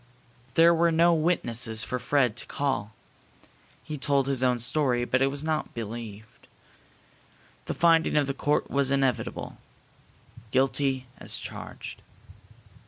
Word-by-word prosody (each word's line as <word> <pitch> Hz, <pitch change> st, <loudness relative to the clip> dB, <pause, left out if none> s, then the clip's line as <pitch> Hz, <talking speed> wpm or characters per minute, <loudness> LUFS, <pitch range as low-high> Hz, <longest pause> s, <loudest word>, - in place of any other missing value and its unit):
There 165 Hz, +1 st, +6 dB
were 170 Hz, 0 st, +3 dB
no 170 Hz, +1 st, +4 dB
witnesses 120 Hz, -9 st, +1 dB
for 125 Hz, -, -3 dB
Fred 125 Hz, -5 st, +1 dB
to -, -, -6 dB
call. 130 Hz, -7 st, -2 dB, 0.9 s
He 155 Hz, -2 st, -6 dB
told 140 Hz, -1 st, +2 dB
his 135 Hz, -2 st, +1 dB
own 125 Hz, -1 st, +2 dB
story, 125 Hz, -1 st, +1 dB
but 130 Hz, +1 st, +1 dB
it 135 Hz, -, +4 dB
was 140 Hz, +1 st, -1 dB
not 155 Hz, -1 st, -2 dB
believed. 110 Hz, -1 st, -8 dB, 1.2 s
The -, -, -4 dB
finding 165 Hz, -2 st, +3 dB
of 145 Hz, -, +3 dB
the 135 Hz, -, -2 dB
court 145 Hz, +2 st, -1 dB
was 140 Hz, -1 st, +2 dB
inevitable: 135 Hz, -3 st, -1 dB, 0.9 s
"Guilty 135 Hz, +1 st, +1 dB
as -, -, -3 dB
charged!" -, -, -8 dB
135 Hz, 130 wpm, -27 LUFS, 120-150 Hz, 1.2 s, There